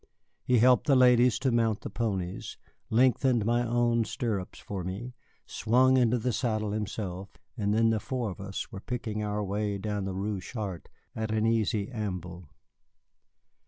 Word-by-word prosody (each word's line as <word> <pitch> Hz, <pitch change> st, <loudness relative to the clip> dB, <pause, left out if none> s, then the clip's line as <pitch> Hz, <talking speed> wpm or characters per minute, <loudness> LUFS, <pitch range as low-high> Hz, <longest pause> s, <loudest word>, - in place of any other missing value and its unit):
He 125 Hz, -, +3 dB
helped 125 Hz, +5 st, +5 dB
the 140 Hz, -, +5 dB
ladies 125 Hz, -1 st, +5 dB
to 135 Hz, -1 st, 0 dB
mount 115 Hz, -3 st, +1 dB
the -, -, -6 dB
ponies, 95 Hz, -6 st, -3 dB, 0.3 s
lengthened 125 Hz, -1 st, +3 dB
my 120 Hz, +1 st, +2 dB
own 120 Hz, 0 st, +2 dB
stirrups 105 Hz, -5 st, -3 dB
for 95 Hz, -3 st, -6 dB
me, 100 Hz, +8 st, -5 dB, 0.3 s
swung 130 Hz, +3 st, +3 dB
into 125 Hz, -1 st, +3 dB
the 120 Hz, +1 st, -1 dB
saddle 110 Hz, -3 st, -1 dB
himself, 100 Hz, -3 st, -4 dB, 0.2 s
and 105 Hz, -4 st, -1 dB
then 115 Hz, +1 st, +3 dB
the 110 Hz, -, +1 dB
four 120 Hz, -1 st, -3 dB
of 95 Hz, -, -9 dB
us 100 Hz, +3 st, -5 dB
were 100 Hz, -, -6 dB
picking 115 Hz, -3 st, -4 dB
our 105 Hz, 0 st, -2 dB
way 100 Hz, +1 st, -2 dB
down 105 Hz, 0 st, -3 dB
the 95 Hz, -1 st, -4 dB
Rue 100 Hz, 0 st, -2 dB
Chartres 100 Hz, -4 st, -6 dB, 0.3 s
at 110 Hz, 0 st, -3 dB
an 110 Hz, 0 st, +1 dB
easy 110 Hz, -1 st, +1 dB
amble. 90 Hz, -, -5 dB
110 Hz, 160 wpm, -29 LUFS, 100-120 Hz, 0.3 s, helped